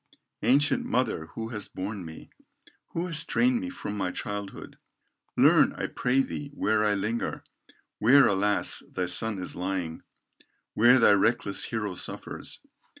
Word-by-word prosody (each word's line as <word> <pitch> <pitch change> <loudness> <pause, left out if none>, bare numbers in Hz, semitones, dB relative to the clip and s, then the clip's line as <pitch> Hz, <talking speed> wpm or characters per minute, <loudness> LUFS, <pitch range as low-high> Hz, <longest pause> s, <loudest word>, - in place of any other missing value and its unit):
"Ancient 145 +3 +3
mother 115 -11 -1
who 115 0 -5
hast 105 -3 -8
borne 95 +1 -4
me, 80 -1 -11 0.6
Who 170 - -2
hast 160 -5 0
trained 250 0 +2
me 275 - -4
from 105 - -6
my 95 -3 -1
childhood, 100 +1 -6 0.6
Learn, - - +5
I - - -4
pray 130 +2 +1
thee, 145 +1 -6
where 110 -4 +1
I 105 -1 +2
linger, 110 +4 -3 0.6
Where 130 +6 +6
alas! 100 +1 +1
thy 90 - -2
son 100 +4 0
is 90 - -5
lying, 90 -3 -3 0.7
Where 120 +4 +6
thy 115 - +6
reckless 100 -1 +2
hero 105 -4 -3
suffers. - - -3
105 Hz, 145 wpm, -27 LUFS, 95-125 Hz, 0.7 s, Where